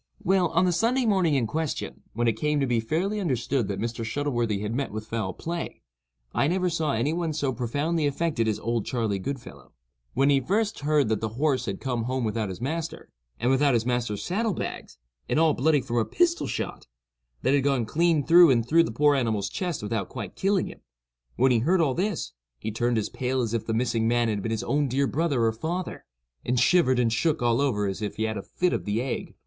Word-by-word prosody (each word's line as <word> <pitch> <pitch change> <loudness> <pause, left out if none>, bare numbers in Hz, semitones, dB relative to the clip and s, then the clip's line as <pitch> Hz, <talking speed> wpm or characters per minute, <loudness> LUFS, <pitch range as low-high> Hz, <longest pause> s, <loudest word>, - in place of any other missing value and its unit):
Well, 185 -1 +3
on 170 +3 +2
the 180 - +3
Sunday 235 +8 +1
morning 185 -8 +3
in 130 -4 +2
question, 155 +5 -3
when 120 +2 0
it 115 - +3
came 150 +5 0
to 140 - +2
be 120 -3 +1
fairly 175 - -1
understood 130 - 0
that 100 -1 -3
Mr. 115 +1 -3
Shuttleworthy 120 -4 -1
had 105 +1 -3
met 135 +3 -1
with 110 +1 -6
foul 110 -4 -2
play, 170 0 -5 0.5
I 140 - +2
never 180 +2 +1
saw 160 -3 0
any 130 +8 0
one 165 -2 -1
so 145 -3 -1
profoundly 145 +6 -1
affected 145 -5 0
as 110 - 0
"Old 115 0 -1
Charley 110 -5 -1
Goodfellow." 115 - -7 0.4
When 135 +2 +4
he 140 - +4
first 205 - 0
heard 145 -2 +2
that 110 -2 0
the 110 - -1
horse 135 -4 +1
had 100 -1 -3
come 120 -4 -2
home 130 0 -1
without 110 -1 -1
his 95 -1 -6
master, 160 +5 -4 0.3
and 125 - +2
without 135 -1 +3
his 115 -1 +1
master's 120 -4 -1
saddle 210 +2 -1
bags, - - -6 0.3
and - - +2
all 160 -2 +4
bloody 145 +2 +2
from 120 -1 -3
a 115 - +3
pistol 345 -1 +1
shot, - - -4 0.6
that 130 - +3
had 140 -2 +3
gone 135 -4 +1
clean 160 +4 +2
through 170 0 +8
and 115 -3 +2
through 165 +4 +5
the - - -4
poor 145 +5 +3
animal's 110 -7 0
chest 175 - -3
without 105 -2 -2
quite 115 -6 -7
killing 195 -1 +1
him; - - -9 0.6
when 130 +2 +3
he 120 - +4
heard 175 +10 +2
all 150 -6 +2
this, 190 +4 -2 0.3
he 110 - -4
turned 120 +2 0
as 110 - -1
pale 130 +1 -2
as 115 -3 -1
if 115 - -2
the - - 0
missing 115 0 +1
man 120 0 +2
had 105 -2 -1
been 115 - -3
his 110 - -2
own 145 0 +1
dear 135 +2 +1
brother 140 -4 0
or 115 - +3
father, 170 +10 -4 0.4
and 125 0 0
shivered 130 -1 +4
and 115 -2 +2
shook 155 +3 +1
all 120 +2 +2
over 110 -8 +1
as 95 +1 -3
if 105 - -3
he 110 - -2
had 110 0 -1
had 100 - -5
a - - -27
fit 180 0 0
of - - -2
the 105 +2 0
ague. 130 +1 -4
130 Hz, 230 wpm, -26 LUFS, 115-160 Hz, 0.6 s, through